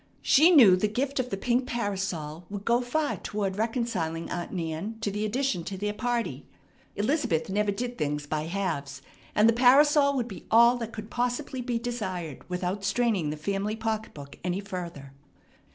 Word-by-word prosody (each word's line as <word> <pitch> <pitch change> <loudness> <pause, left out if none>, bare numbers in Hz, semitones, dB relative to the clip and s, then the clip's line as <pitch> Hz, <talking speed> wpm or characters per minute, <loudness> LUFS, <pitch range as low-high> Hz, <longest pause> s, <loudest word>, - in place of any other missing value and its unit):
She 315 +5 +6
knew 245 - +8
the 185 +3 +1
gift 265 +6 -2
of 250 -1 -1
the 195 - -3
pink 245 +5 0
parasol 190 - -3
would 205 0 -6
go 235 +1 +3
far 290 +5 -1
toward 200 -3 -3
reconciling 215 -8 -2
Aunt 175 -1 -4
Nan 175 +5 -4
to 205 - -1
the 210 +2 -2
addition 240 -5 -1
to 190 - -5
their 205 +2 -2
party. 240 +1 -2 0.5
Elizabeth 205 - 0
never 205 +1 +1
did 240 +4 -4
things 150 -1 -1
by 155 +1 -2
halves, 150 -8 -3 0.3
and 210 +1 +5
the 230 - +5
parasol 280 +4 +5
would 245 -3 -1
be 195 - -10
all 235 +2 +6
that 230 -2 -5
could 215 0 -8
possibly 245 +2 -2
be 245 -1 -1
desired 190 - -4
without 180 +2 -2
straining 200 -5 +1
the 150 - -4
family 200 +6 -2
pocketbook 220 -11 -5
any 180 +1 -1
further. 175 -8 -7
210 Hz, 170 wpm, -27 LUFS, 180-240 Hz, 0.5 s, knew